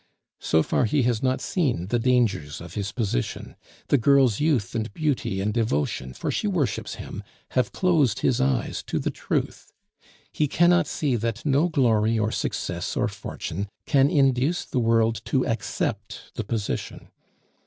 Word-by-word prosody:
So 80 0 +2
far, - - +1
he 135 +5 +2
has 120 -2 +1
not 130 0 0
seen 130 - 0
the 120 - +1
dangers 110 - +1
of 85 0 -10
his 100 -1 -3
position; 100 - -3 0.3
the 145 - +4
girl's 130 -3 +4
youth 145 -11 +1
and 115 -1 -2
beauty 145 - -1
and 105 +2 -1
devotion 75 - -1
(for - - -2
she - - -1
worships 155 - -1
him) - - -7 0.3
have 125 - 0
closed 145 - +2
his 130 -1 +2
eyes 130 -3 0
to - - -1
the - - -1
truth; - - -3 0.6
he 150 - +1
cannot 175 +4 +4
see 140 -5 0
that 115 +2 -3
no 145 +4 +3
glory 115 -7 +2
or 110 0 0
success - - -3
or - - +2
fortune 100 +5 -5 0.2
can 140 0 +4
induce 135 +3 +2
the 130 - -2
world 115 -1 +2
to 130 -2 +1
accept 110 -2 -3
the 115 - -3
position. 105 -1 -4
120 Hz, 160 wpm, -25 LUFS, 105-140 Hz, 0.6 s, the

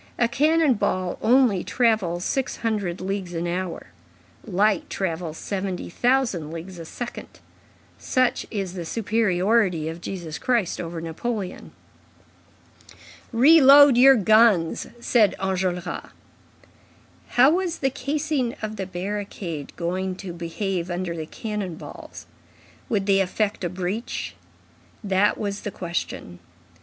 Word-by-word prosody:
A 235 - +3
cannon 300 +4 +3
ball 185 -4 -1
only 235 -6 +4
travels 215 -8 +1
six 270 -2 -1
hundred 200 -6 -1
leagues 190 -2 -3
an 165 +1 -2
hour; 175 0 -4 0.5
light 205 0 +1
travels 165 -3 -3
seventy 190 -3 -4
thousand 240 - +1
leagues 170 +3 -8
a 165 - -7
second. 240 +8 -8 0.6
Such 255 -1 0
is 195 -4 -3
the 180 -2 -5
superiority 195 -3 +1
of 165 +1 -7
Jesus 170 -4 -6
Christ 235 -8 0
over 165 -1 -5
Napoleon." 190 +4 -4 1.6
"Reload 280 +1 +8
your 265 +2 +8
guns," 215 -5 +4
said 230 -4 +3
Enjolras. 185 -2 -2 1.3
How 260 +4 +7
was 350 -1 0
the 270 -1 0
casing 280 -1 -1
of 215 0 -5
the 190 -1 -4
barricade 185 -5 -5
going 185 +2 -2
to 185 -2 -7
behave 175 +1 -3
under 175 -1 -3
the 160 -1 -5
cannon 210 -5 -4
balls? - - -10 0.6
Would 205 -4 0
they 195 -1 +4
effect 200 +2 -1
a 175 - 0
breach? 185 +6 -4 0.7
That 195 0 +2
was 200 -1 -3
the - - -4
question. 170 - -5
195 Hz, 120 wpm, -24 LUFS, 175-235 Hz, 1.6 s, Reload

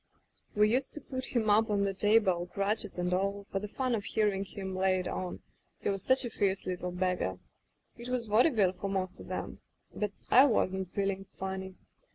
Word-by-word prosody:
"We 210 +1 +4
used 260 +3 0
to - - -6
put 260 -1 -5
him 225 -2 +2
up 220 +2 +4
on 200 -1 +2
the 195 -1 0
table, 195 -3 +3
crutches 200 +1 -1
and 180 0 0
all, 200 +2 -1
for 195 - 0
the 210 - -5
fun 255 +3 -1
of 215 -3 0
hearing 205 -3 +1
him 190 -1 -6
lay 185 0 +2
it 180 - -3
on 180 -1 -4 0.2
— - - -44
he - - +1
was 195 -1 -2
such 260 0 +3
a 240 - -4
fierce 195 -2 0
little 180 -1 -3
beggar. 180 - -1 0.6
It 240 +1 -7
was 250 -2 -1
vaudeville 215 - +4
for 200 - -4
most 185 -1 -2
of - - -10
*em. - - -4 0.3
But 210 -1 -2 0.2
I 260 +3 +9
wasn't 190 -7 +1
feeling 195 -1 -1
funny. 190 0 -4
200 Hz, 205 wpm, -31 LUFS, 185-220 Hz, 0.6 s, I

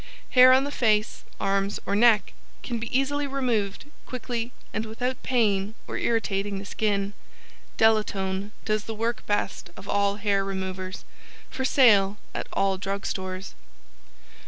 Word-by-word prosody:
] - - -27
Hair 255 0 +8
on 260 +1 +5
the 285 - -3
Face 215 -5 +1 0.2
Arms 195 +1 0
or 200 - 0
Neck 220 -1 +4 0.3
can 235 -2 -3
be 235 - -4
easily 285 +2 0
removed 245 -8 -1 0.2
quickly 240 -1 -4 0.2
and 220 - -1
without 250 +4 -3
pain 215 -4 +1
or - - -5
irritating 205 -3 0
the 195 - -6
skin. 200 -1 -1 0.6
DELATONE 205 -3 +1
does 215 -1 0
the 225 - -5
work 230 +1 -2
best 200 -2 -1
of 195 - -11
all 200 0 +2
hair 200 -1 +1
removers. 190 0 -5 0.5
For 260 - -3
sale 210 -7 +5 0.2
at - - -4
all 195 -1 +1
Drug 200 0 -3
Stores. 185 0 -4
210 Hz, 145 wpm, -26 LUFS, 195-235 Hz, 0.6 s, Hair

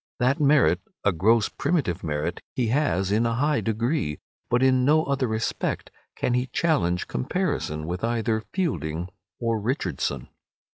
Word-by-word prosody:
That 130 +2 +2
merit, 140 - +4 0.2
a 100 - +4
gross 105 +6 +3
primitive 140 - -1
merit, 75 +2 -2
he 120 -3 0
has 110 - +1
in 110 +3 +3
a 115 - 0
high 145 +4 +1
degree, 115 - -1 0.3
but 120 +2 +2
in 130 -1 +4
no 155 +4 +4
other 140 -2 0
respect 110 0 -2 0.2
can 120 - 0
he 125 +1 +1
challenge 130 - +1
comparison 75 +4 -2
with 90 +4 -4
either 115 -1 0
Fielding 85 - -2 0.3
or 115 -2 0
Richardson. 90 - -2
115 Hz, 145 wpm, -25 LUFS, 90-130 Hz, 0.3 s, merit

